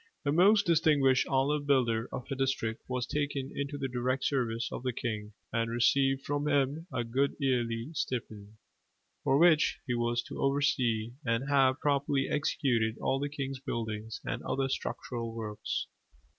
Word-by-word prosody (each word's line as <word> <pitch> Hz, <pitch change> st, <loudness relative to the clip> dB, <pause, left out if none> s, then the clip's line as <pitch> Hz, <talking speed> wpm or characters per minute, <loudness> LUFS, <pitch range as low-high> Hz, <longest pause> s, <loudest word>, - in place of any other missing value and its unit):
The 140 Hz, -, +1 dB
most 195 Hz, +6 st, +5 dB
distinguished 150 Hz, -6 st, +4 dB
ollave 145 Hz, +2 st, +1 dB
builder 120 Hz, -4 st, +2 dB
of 125 Hz, -, -5 dB
a -, -, 0 dB
district 130 Hz, -4 st, -1 dB
was 125 Hz, -1 st, -2 dB
taken 145 Hz, -2 st, -2 dB
into 140 Hz, 0 st, -3 dB
the 135 Hz, -1 st, -2 dB
direct 130 Hz, +1 st, -1 dB
service 120 Hz, -5 st, 0 dB
of -, -, -5 dB
the 125 Hz, 0 st, -1 dB
king, 105 Hz, -3 st, -4 dB, 0.2 s
and 115 Hz, 0 st, 0 dB
received 135 Hz, +3 st, +2 dB
from 145 Hz, +1 st, -1 dB
him 145 Hz, +3 st, +1 dB
a 120 Hz, -, -1 dB
good 130 Hz, +5 st, 0 dB
yearly 120 Hz, -3 st, 0 dB
stipend: 110 Hz, -7 st, -4 dB, 0.7 s
for 135 Hz, -, +3 dB
which 160 Hz, -1 st, +5 dB
he 125 Hz, -, -1 dB
was 120 Hz, 0 st, 0 dB
to -, -, -7 dB
oversee 125 Hz, -5 st, +1 dB
and 115 Hz, +3 st, 0 dB
have 135 Hz, -1 st, +3 dB
properly 140 Hz, -1 st, +1 dB
executed 120 Hz, -6 st, 0 dB
all 135 Hz, -, 0 dB
the 145 Hz, +1 st, -2 dB
king's 135 Hz, -2 st, -4 dB
building 110 Hz, -4 st, -4 dB, 0.2 s
and 120 Hz, -, -3 dB
other 135 Hz, 0 st, -1 dB
structural 115 Hz, -3 st, -4 dB
works. 105 Hz, -2 st, -3 dB
130 Hz, 155 wpm, -30 LUFS, 115-140 Hz, 0.7 s, most